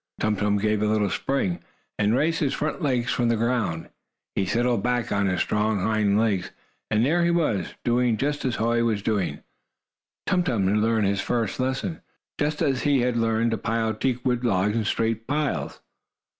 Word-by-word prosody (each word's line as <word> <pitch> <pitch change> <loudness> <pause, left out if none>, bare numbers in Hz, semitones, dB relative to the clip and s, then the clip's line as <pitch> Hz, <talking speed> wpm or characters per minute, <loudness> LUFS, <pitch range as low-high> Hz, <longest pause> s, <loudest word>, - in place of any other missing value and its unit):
Tum 110 0 +1
Tum 105 0 +1
gave 105 0 0
a 105 - +2
little 105 -2 +1
spring, 95 -6 -1 0.4
and 105 +2 +3
raised 165 +5 +1
his 140 -3 0
front 155 0 -3
legs 125 -4 0
from 120 - +1
the 115 - +3
ground. 115 -8 -1 0.4
He 95 - -1
settled 120 +2 +1
back 120 +1 -1
on 100 -1 +1
his 90 -1 0
strong 105 0 0
hind 105 0 +2
legs, 100 -5 0 0.4
and 110 +2 +2
there 170 +5 +2
he 170 - +3
was, 150 - 0
doing 120 -1 +2
just 145 +4 -1
as 130 -3 0
Hoy 115 +1 +1
was 110 -3 0
doing! 105 -5 -1 0.8
Tum 180 -1 +2
Tum 115 - 0
had 105 +2 +2
learned 110 0 +2
his 100 0 +1
first 115 -2 -1
lesson, 130 +6 -2 0.4
just 150 +2 0
as 135 -4 +1
he 145 -3 +2
had 125 0 0
learned 115 0 +1
to 115 - -1
pile 115 0 0
teakwood 125 +1 -1
logs 105 -2 +1
in 115 -2 0
straight 115 +1 -1
piles. 145 +1 -2
115 Hz, 185 wpm, -25 LUFS, 105-130 Hz, 0.8 s, and